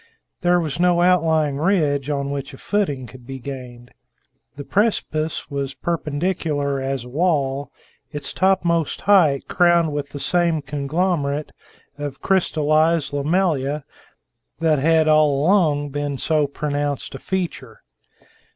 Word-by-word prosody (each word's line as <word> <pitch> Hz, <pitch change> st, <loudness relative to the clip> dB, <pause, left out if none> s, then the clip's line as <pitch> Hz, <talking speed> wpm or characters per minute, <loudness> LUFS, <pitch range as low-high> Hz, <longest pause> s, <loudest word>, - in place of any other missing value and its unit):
There 175 Hz, 0 st, +3 dB
was 155 Hz, -2 st, -3 dB
no 175 Hz, -1 st, +3 dB
outlying 160 Hz, -5 st, +2 dB
ridge 150 Hz, -6 st, +1 dB
on 140 Hz, -1 st, -2 dB
which 140 Hz, -1 st, -5 dB
a -, -, -14 dB
footing 150 Hz, -11 st, -1 dB
could 125 Hz, 0 st, -14 dB
be 135 Hz, 0 st, -6 dB
gained. 125 Hz, -2 st, -9 dB, 0.6 s
The 145 Hz, -, -7 dB
precipice 160 Hz, -7 st, -1 dB
was 140 Hz, -1 st, -3 dB
perpendicular 150 Hz, -3 st, -2 dB
as 135 Hz, -2 st, -3 dB
a -, -, -10 dB
wall, 140 Hz, -2 st, 0 dB, 0.4 s
its 145 Hz, -2 st, -4 dB
topmost 175 Hz, -4 st, +1 dB
height 170 Hz, -9 st, +4 dB
crowned 170 Hz, -3 st, +3 dB
with 145 Hz, -1 st, -3 dB
the 145 Hz, -, -7 dB
same 170 Hz, -1 st, +1 dB
conglomerate 145 Hz, +1 st, -1 dB, 0.5 s
of 145 Hz, -2 st, -5 dB
crystallized 155 Hz, -4 st, +2 dB
lamellae 150 Hz, -2 st, 0 dB, 0.8 s
that 160 Hz, -3 st, +2 dB
had 160 Hz, +2 st, +3 dB
all 155 Hz, -2 st, +4 dB
along 150 Hz, -4 st, +2 dB
been 145 Hz, 0 st, -3 dB
so 150 Hz, +1 st, +1 dB
pronounced 145 Hz, 0 st, -3 dB
a 135 Hz, -, -7 dB
feature. 165 Hz, -, -4 dB
150 Hz, 125 wpm, -21 LUFS, 140-170 Hz, 0.8 s, height